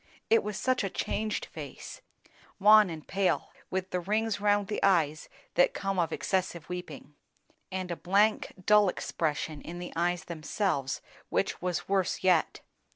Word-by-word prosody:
It 455 - +6
was 210 -1 -4
such 255 -3 +1
a 195 - -1
changed 215 +3 -2
face; - - -9 0.6
wan 210 0 +7
and 160 -2 -7
pale, 195 -1 0 0.2
with 185 0 -3
the 180 - 0
rings 210 +3 -1
round 205 0 +3
the 210 - -3
eyes 160 -5 +2 0.2
that - - +3
come 195 -1 -1
of 165 -2 +1
excessive 185 -4 -1
weeping, 160 -5 -7 0.6
and 185 -1 -3
a - - -1
blank, 205 +5 +2
dull 210 -2 +6
expression 155 -3 -2
in 175 - -7
the 175 0 -7
eyes 175 +1 0
themselves 160 -3 -2 0.3
which - - -1
was 180 -2 -2
worse 190 -2 0
yet. 180 -4 +2
185 Hz, 155 wpm, -29 LUFS, 170-205 Hz, 0.6 s, wan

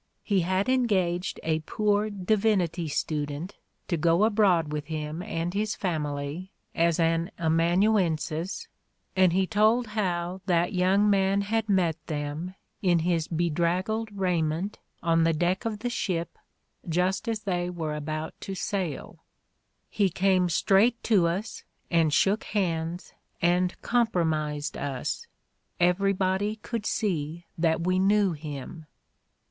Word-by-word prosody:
He 200 -3 +2
had 185 +3 0
en 255 -1 +2
gaged 180 -3 0
a 160 -1 +1
poor 210 +6 0
divinity 195 -4 +1
student 150 +3 -3 0.3
to 170 - 0
go 170 +4 +3
abroad 195 -8 +3
with 150 -1 -4
him 155 +1 -4
and 170 0 -3
his 210 +1 -1
family 155 0 -3 0.2
as 170 0 +2
an 165 +1 +2
amanuensis 170 0 +1 0.5
and 185 -2 +5
he 190 +2 +2
told 220 +4 +3
how 180 -3 -1
that 175 -1 +2
young 190 +3 +3
man 195 0 +3
had 220 +2 -1
met 170 -5 +1
them, 150 +4 -4 0.3
in 180 -3 +3
his 170 -3 +1
bedraggled 175 +7 0
raiment, 175 0 -1 0.2
on 165 -1 +3
the 165 0 +3
deck 175 +6 0
of 220 -2 -2
the 245 - -1
ship, 175 -7 -2 0.5
just 180 +5 0
as 225 -2 -1
they 180 -3 -1
were 165 -4 -3
about 155 +1 -4
to 195 - -5
sail: 185 -6 -4 0.6
"He 200 -3 +1
came 185 0 +2
straight 200 +8 +3
to 195 -7 +4
us, 190 +6 -3 0.3
and 165 -3 +3
shook 195 +7 +2
hands 170 -3 -2 0.3
and 180 +1 +1
com 240 -1 +3
promised 155 -6 -1
us. 145 - -3 0.5
Everybody 190 +3 +2
could 225 0 -5
see 170 -5 -2
that 165 0 +1
we 185 0 +2
knew 200 0 +3
him. 150 0 -7
180 Hz, 130 wpm, -27 LUFS, 165-200 Hz, 0.6 s, and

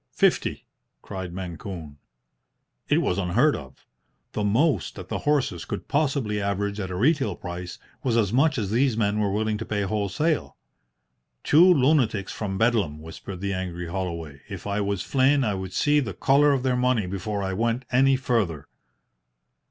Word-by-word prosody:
"Fifty!" - - +1 0.4
cried 95 -3 -6
Mancune. 85 -4 -7 0.9
It - - +3
was 90 - 0
unheard 90 -2 +3
of. - - -11 0.5
The 105 - -2
most 130 +10 +1
that 95 -1 -9
the - - -2
horses 135 - +1
could - - -6
possibly 140 -8 0
average 100 +1 -1
at 95 -2 -3
a 90 - -4
retail 130 - +2
price 90 +1 -7 0.2
was 120 -3 +1
as 105 -2 +1
much 150 +4 +3
as 105 -4 -2
these 120 0 +2
men 105 -1 +1
were 105 -2 +1
willing 110 +1 -1
to - - -3
pay 105 -2 -1
wholesale. 105 - -1 0.9
"Two 175 +5 +6
lunatics 130 - +2
from 95 -3 -3
Bedlam," 105 -10 +1
whispered 80 +4 -9
the 100 0 -1
angry 90 -2 -4
Holloway. 85 -6 -4
"If 95 -3 -7
I 100 0 -1
was 100 -2 -1
Flynn 135 +1 +3
I 105 -4 0
would 95 -1 -5
see 150 +6 +3
the 115 -9 -3
colour 140 +7 +4
of 135 -3 0
their 130 -1 +1
money 125 -4 +2
before 100 +2 -3
I 95 0 -2
went 115 +5 -1
any 135 +2 +4
further." 115 - -1
105 Hz, 165 wpm, -25 LUFS, 95-130 Hz, 0.9 s, Two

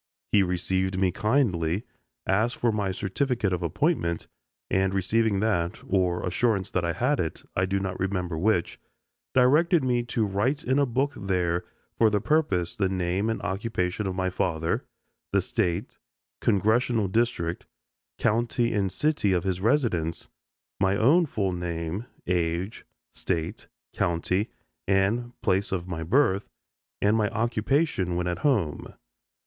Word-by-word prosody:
He 100 - +5
received 95 +1 0
me 95 -1 +2
kindly, 100 - +1 0.4
asked 110 +5 +1
for 120 - +2
my 105 -3 -1
certificate 105 +2 -1
of 90 - -1
appointment, 85 - 0 0.4
and 95 0 +1
receiving 100 +1 +2
that 95 -4 0
or 90 -2 +1
assurance 100 +1 0
that 90 - 0
I 85 0 0
had 130 - +1
it 80 - -3
I 90 +1 +1
do 100 +1 0
not 95 -1 -4
remember 90 -3 -1
which 90 +1 0 0.6
directed 150 +6 +4
me 125 -2 +2
to 115 -1 0
write 105 +9 0
in 130 +3 +2
a 140 - +3
book 135 +4 0
there 90 -3 -1 0.3
for 115 - +6
the 105 -1 +1
purpose 100 - +1
the 95 -2 +1
name 95 +3 0
and 115 - -2
occupation 95 0 -2
of 95 - -3
my 95 0 -1
father, 80 -3 -1 0.5
the - - +4
State, 85 +2 -2 0.4
Congressional 110 +2 +2
district, 95 -5 -1 0.5
county 115 +1 +1
and 100 -3 0
city 150 -10 +1
of 90 -2 +1
his 95 -1 -1
residence, 105 - 0 0.5
my 95 0 +2
own 155 - +4
full 100 -8 -1
name, 90 +4 -4 0.2
age, 85 +2 -1 0.2
State, 85 -4 -3 0.3
county, 90 +4 0 0.4
and 105 +6 +1
place 95 +2 +1
of 90 -2 -2
my 85 -3 -4
birth, 100 - +2 0.5
and 105 +2 +4
my 105 -2 +2
occupation 115 - 0
when 90 0 -1
at 90 0 -2
home. 100 - 0
95 Hz, 145 wpm, -26 LUFS, 90-115 Hz, 0.6 s, for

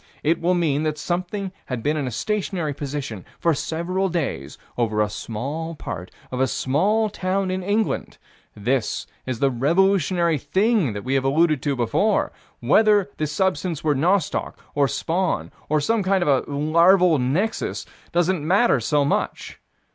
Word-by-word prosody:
It 160 +3 +1
will 180 +2 +2
mean 155 -5 +1
that 155 -1 -1
something 185 +4 -3 0.2
had 125 -4 -4
been 150 +1 +1
in 145 -4 -2
a - - -1
stationary 175 - -2
position 140 -8 -5
for 170 - +2
several 180 +6 -1
days 155 - -3 0.2
over 110 -3 0
a 105 - +3
small 145 +11 -4
part 95 - -6 0.2
of 130 - -3
a 130 - +3
small 190 - +1
town 190 -2 -1
in 185 0 -2
England: 205 +4 -1 0.4
this 120 +2 -1 0.2
is 130 -2 -2
the 135 +3 +2
revolutionary 170 +3 +2
thing 190 - +1
that 105 - -6
we 130 - -2
have 135 -1 +2
alluded 155 +1 +2
to 145 -2 0
before; 125 - +1 0.3
whether 210 -2 +4
the 155 - -1
substance 180 0 -1
were 155 -2 +3
nostoc, 170 +4 0 0.2
or 140 -1 +3
spawn, 165 - -1 0.2
or 155 0 +3
some 225 +9 +1
kind 190 -1 +2
of - - -3 0.2
a - - -8
larval 170 +3 +4
nexus, 165 - -1 0.3
doesn't 175 -2 +1
matter 190 - +3
so 145 +5 +1
much. 140 - -2
160 Hz, 160 wpm, -23 LUFS, 135-185 Hz, 0.4 s, whether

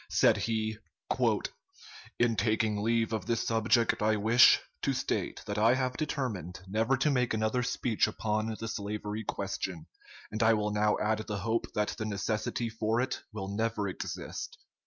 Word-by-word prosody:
Said - - +4
he: 110 -1 -1 1.4
"In 120 -1 +3
taking 110 0 +1
leave 115 0 +1
of 110 -4 -3
this 115 -1 0
subject 115 0 +2
I 110 +1 +3
wish, 115 +4 +6 0.2
to - - +1
state - - -2
that 105 0 -2
I 115 +4 +5
have 130 -1 -1
determined 115 - -3
never 110 +7 +1
to 145 +3 +2
make 125 -4 +1
another 110 +3 +1
speech 125 -2 +1
upon 110 0 -1
the 115 - -4
slavery 105 0 -4
question; 95 -5 -4 0.5
and 110 +1 -3
I 110 0 +5
will 105 0 -1
now 105 0 +2
add 110 0 0
the 105 -1 -4
hope 115 +4 -1
that 105 0 +1
the 110 - -2
necessity 110 +3 -2
for 110 +1 -1
it 130 +1 -1
will 100 -3 -5
never 110 -2 0
exist.... 95 - -5
110 Hz, 160 wpm, -30 LUFS, 105-115 Hz, 1.4 s, wish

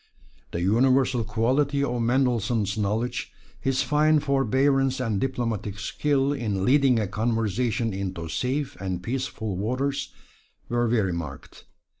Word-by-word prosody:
The 85 - -3
universal 125 +4 +3
quality 130 +7 +1
of 125 -3 -1
Mendelssohn's 115 -4 +1
knowledge, 110 +4 -2 0.3
his 135 -1 +1
fine 150 +2 +3
forbearance 135 -1 +2
and 110 -6 -1
diplomatic 115 -6 -2
skill 140 +5 0
in 105 -8 -2
leading 135 -2 +4
a 105 - 0
conversation 115 +1 0
into 95 -3 -4
safe 130 - -2
and 90 -2 -3
peaceful 115 -4 -3
waters, 130 +7 -2 0.6
were 120 0 +1
very 110 -6 +1
marked. 75 -5 -7
120 Hz, 120 wpm, -25 LUFS, 105-135 Hz, 0.6 s, leading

